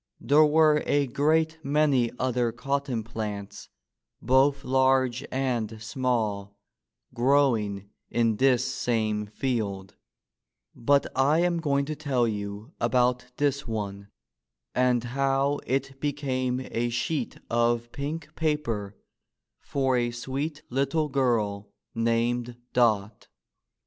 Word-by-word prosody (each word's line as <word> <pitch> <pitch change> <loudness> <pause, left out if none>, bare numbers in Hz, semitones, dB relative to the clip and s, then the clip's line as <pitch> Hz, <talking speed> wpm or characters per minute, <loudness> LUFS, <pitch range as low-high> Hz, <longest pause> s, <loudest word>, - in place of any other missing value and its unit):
There 150 +2 +5
were 155 0 +4
a 145 0 +3
great 160 +5 +1
many 140 -4 +2
other 125 -2 0
cotton 140 -3 -2
plants 105 -3 -6 0.5
both 135 +2 +3
large 130 -1 +2
and 120 -5 -1
small 110 -4 -2 0.6
growing 115 -7 +1 0.2
in 115 -2 +1
this 130 -1 +3
same 110 -5 -1
field, 105 -5 -3 0.8
but 140 +4 +2
I 145 +5 +3
am 175 -1 +1
going 140 -3 +1
to 155 +1 -4
tell 135 -5 0
you 105 +3 -5
about 125 -1 +2
this 140 -1 0
one, 100 -3 -4 0.7
and 125 -2 +2
how 135 +3 0
it 135 +1 -2
became 130 -3 -1
a 120 +1 0
sheet 120 +6 -2
of 120 0 +1
pink 155 +2 -5
paper 130 -12 -2 0.6
for 135 -2 0
a 120 -1 +1
sweet 135 +6 -4
little 140 +4 0
girl 110 -7 0 0.2
named 115 +1 0 0.2
Dot. 110 -4 +1
125 Hz, 110 wpm, -27 LUFS, 115-140 Hz, 0.8 s, There